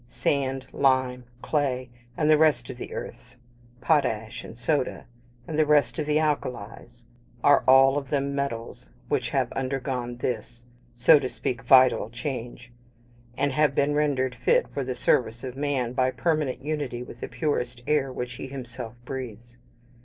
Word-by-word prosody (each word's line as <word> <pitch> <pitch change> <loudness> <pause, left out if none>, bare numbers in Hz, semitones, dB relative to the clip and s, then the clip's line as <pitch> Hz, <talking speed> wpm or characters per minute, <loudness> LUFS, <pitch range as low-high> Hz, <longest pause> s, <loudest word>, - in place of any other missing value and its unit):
Sand, 135 +2 -1
lime, 130 -2 +1 0.2
clay, 130 -4 -1 0.3
and 150 - +1
the 155 - +7
rest 155 -3 +3
of 125 - -10
the - - -7
earths 125 +1 -8 0.4
potash 120 -8 0
and 115 - -10
soda, 130 +2 -1 0.4
and 155 -1 -2
the 155 - +5
rest 145 -2 +3
of 150 - -2
the 150 0 +2
alkalies 120 -6 -3 0.4
are 145 -1 +5
all 135 +2 +6
of 135 -2 -11
them 140 -1 0
metals 120 - -4 0.2
which - - 0
have - - 0
undergone 130 -2 -3
this, 120 0 -4 0.3
so 135 +6 +6
to 130 -2 -3
speak, 120 0 -3
vital 130 -2 +5
change, 120 -1 -6 0.7
and 145 - +1
have 150 0 +2
been 140 +1 +2
rendered 140 -4 +1
fit 485 - +2
for 140 - -3
the 130 0 -3
service 115 -2 +1
of 130 -1 -6
man 135 -4 -1
by 130 0 +2
permanent 150 -2 -1
unity 145 -5 -3
with 120 - -11
the - - -5
purest 125 -2 -2
air 145 -3 +1
which 125 -1 -5
he 135 - -6
himself 125 -3 -7
breathes. 120 -2 -7
130 Hz, 160 wpm, -26 LUFS, 120-145 Hz, 0.7 s, the